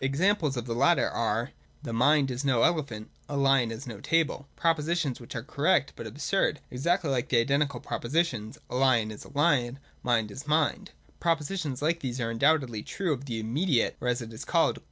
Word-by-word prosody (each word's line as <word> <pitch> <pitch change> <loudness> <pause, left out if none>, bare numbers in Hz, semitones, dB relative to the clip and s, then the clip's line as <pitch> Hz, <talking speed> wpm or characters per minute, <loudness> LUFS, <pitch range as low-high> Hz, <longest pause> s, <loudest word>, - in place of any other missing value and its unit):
Examples 150 +1 +1
of 120 - -3
the 120 - -3
latter 115 - +3
are: - - -1 0.3
'The 115 - -5
mind 135 +3 +3
is 125 +2 -3
no 130 -4 +2
elephant:' 135 -10 0
' - - -34
A 145 - -2
lion 135 -3 +3
is 115 +4 -6
no 115 -5 -7
table; 160 -2 0
' - - -36
propositions 165 -3 +1
which 120 +2 -10
are 115 - -3
correct 145 +1 +1
but 115 - -7
absurd, 150 - 0
exactly 165 +4 0
like 125 -3 -1
the 125 - +3
identical 140 +2 +1
propositions: 125 -4 -2
' - - -36
A 125 - -1
lion 125 -5 +3
is 105 - -10
a - - -12
lion; 140 -5 +2
' - - -30
' - - -33
Mind 110 -3 +2
is 135 +7 -9
mind.' 160 +6 +1 0.3
Propositions 160 -4 -1
like 165 +2 +1
these 130 -4 -4
are 115 -1 -1
undoubtedly 135 -2 +2
the - - -15
truth 170 -9 -2
of 140 - -11
the 115 -4 -3
immediate, 125 +5 +1
or, 125 - -2
as 125 0 0
it 115 0 -10
is 110 - -7
called. - - +2
135 Hz, 215 wpm, -28 LUFS, 120-155 Hz, 0.3 s, latter